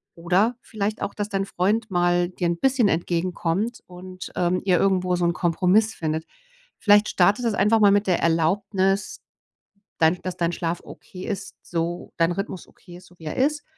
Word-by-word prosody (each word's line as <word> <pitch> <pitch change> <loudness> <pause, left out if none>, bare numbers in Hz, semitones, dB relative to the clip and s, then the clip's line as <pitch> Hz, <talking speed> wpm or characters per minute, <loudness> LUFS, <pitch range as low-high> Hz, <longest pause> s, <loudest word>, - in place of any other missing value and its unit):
Oder 185 +8 +1
vielleicht 215 0 -4
auch, 200 - -3
dass 205 -1 -2
dein 195 -2 -1
Freund 215 +5 0
mal 175 -1 +2
dir 180 -1 -2
'n 170 0 -1
bisschen 260 -5 +3
entgegenkommt 175 +5 -1
und, 185 +1 -10
ähm, 180 +1 +1
ihr 185 -2 +3
irgendwo 185 -2 +2
so 175 0 0
'nen 170 - +2
Kompromiss 185 +6 +2
findet. 160 0 -3 0.5
Vielleicht 205 0 +5
startet 200 +6 +3
ihr - - +3
das 210 - -3
einfach 210 +3 +4
mal 205 -1 +6
mit 205 +1 +3
der 180 - +2
Erlaubnis, 190 +4 0 0.8
dein 165 +2 +3
dass 185 -1 -4
dein 170 -1 0
Schlaf 170 0 -3
okay 185 0 -11
ist 195 -3 -5
so 170 +1 -3
dein 165 +1 +2
Rhythmus 195 -1 -5
okay 175 -2 -15
ist, 180 - -16
so 180 - -21
wie 160 - -12
er 155 - -5
ist. 290 +3 +1
185 Hz, 185 wpm, -23 LUFS, 175-205 Hz, 0.8 s, mal